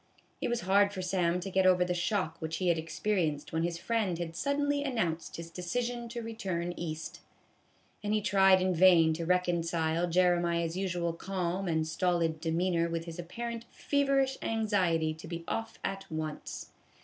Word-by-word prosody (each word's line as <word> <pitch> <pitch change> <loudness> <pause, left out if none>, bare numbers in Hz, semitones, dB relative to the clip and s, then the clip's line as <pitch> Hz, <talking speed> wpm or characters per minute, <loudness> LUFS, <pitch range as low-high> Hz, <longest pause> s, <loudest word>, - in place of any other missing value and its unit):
It - - 0
was 240 0 -1
hard 200 +3 +4
for 190 -2 -5
Sam 180 -1 +1
to 195 +2 -5
get 190 0 +3
over 180 -1 +5
the 180 - 0
shock 175 -1 -1
which 160 0 -3
he 180 0 +1
had 165 -2 +2
experienced 160 -3 -1
when 160 - +1
his 170 0 -1
friend 210 -3 0
had 165 -1 -5
suddenly 285 +5 0
an 270 -3 -2
nounced 170 -7 -1
his 165 0 -8
decision 235 +7 -3
to 235 0 -5
return 185 -6 -3
East; 160 -2 -5 0.8
and 205 - -1
he 215 - +3
tried 195 -2 +5
in 185 0 +2
vain 170 -2 +6
to 165 +1 -4
reconcile 170 -2 +1
Jeremiah's 170 -1 +2
usual 175 -3 -1
calm 185 +1 -2
and 160 -2 0
stolid 165 -1 0
demeanor 170 0 +1
with 165 0 -3
his 165 0 -8
apparent 230 +6 -5
feverish 275 -2 +1
anxiety 185 -8 +1
to 160 - -11
be 170 0 -5
off 225 0 -3
at 195 0 -4
once. 155 -1 -5
180 Hz, 175 wpm, -31 LUFS, 165-200 Hz, 0.8 s, vain